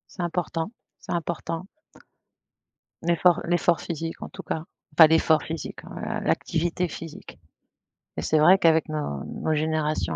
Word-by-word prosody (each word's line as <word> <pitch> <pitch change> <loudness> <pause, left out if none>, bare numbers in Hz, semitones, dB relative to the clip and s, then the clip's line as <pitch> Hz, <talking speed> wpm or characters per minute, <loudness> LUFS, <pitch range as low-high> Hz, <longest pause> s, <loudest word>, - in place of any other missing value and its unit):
C'est 180 - -3
important, 170 +1 -2 0.3
c'est - - -9
important. 170 +1 -3 1.4
L'effort 170 +1 +4
l'effort 175 0 +2
physique 165 -1 -5
en - - -5
tout - - -9
cas. 160 - -3 0.3
Enfin 160 +1 +9
l'effort 160 -1 +4
physique, 160 0 -6
heu, - - -11 0.4
l'activité 175 +2 0
physique 160 0 -9 0.8
et - - -1
c'est 155 - +2
vrai 175 +5 +7
qu'avec 160 -3 +3
nos 145 - -3
nos 160 - -2
générations 155 - 0
160 Hz, 135 wpm, -25 LUFS, 155-170 Hz, 1.4 s, Enfin